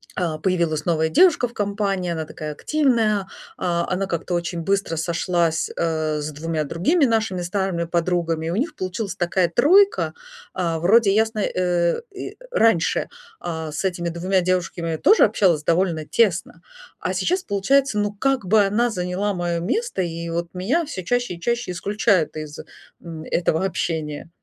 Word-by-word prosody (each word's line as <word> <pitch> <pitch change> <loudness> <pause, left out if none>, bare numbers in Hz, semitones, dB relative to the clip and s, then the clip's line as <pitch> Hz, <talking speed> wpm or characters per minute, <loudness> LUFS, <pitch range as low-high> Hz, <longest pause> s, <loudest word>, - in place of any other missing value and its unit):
а, 165 -4 -1
появилась 170 -4 0
новая 160 -2 +2
девушка 335 - +4
в 235 - -16
компании, 200 -3 -1
она 160 -1 -3
такая 155 0 -6
активная, 225 - +1 0.3
а, 170 -2 0
она 190 +2 0
как-то 175 0 -3
очень 170 0 -2
быстро 195 -1 0
сошлась, 170 0 0
э, 155 -2 -1
с 150 +1 -4
2 155 +1 -2
другими 275 - +2
нашими 220 -6 0
старыми 180 -1 -1
подругами, 170 -1 -1
у 175 - -1
них 300 +7 -1
получилась 185 +2 -4
такая 175 0 +1
тройка, 390 - +4 0.4
а, 170 -3 -1
вроде 200 +4 +4
ясни 220 -1 +1
э, 175 - 0
и, 385 - -6
э, - - -18 0.2
раньше, 225 - +2 0.3
а, 160 -2 -4
с 155 - -3
этими 175 -2 -1
2 185 +3 0
девушками 175 -2 -1
тоже 425 - +5
общалась 185 -8 +2
довольно 165 -2 +1
тесно, 195 -3 0 0.4
а - - -2
сейчас 370 +1 0
получается, 220 +3 +1
ну 205 0 0
как 265 +2 0
бы 215 +2 +5
она 235 +5 +1
заняла 185 +1 -2
моё 175 -1 -1
место 445 - -1
и 170 -1 -4
вот 170 0 -3
меня 230 - 0
всё 190 -11 -6
чаще 245 0 -1
и 170 - -13
чаще 235 -4 -1
исключают 200 -1 +1
из, 155 -1 -7 0.4
м, 165 -2 -8
этого 165 0 0
общения. 160 -5 -3
180 Hz, 160 wpm, -22 LUFS, 170-210 Hz, 0.4 s, тоже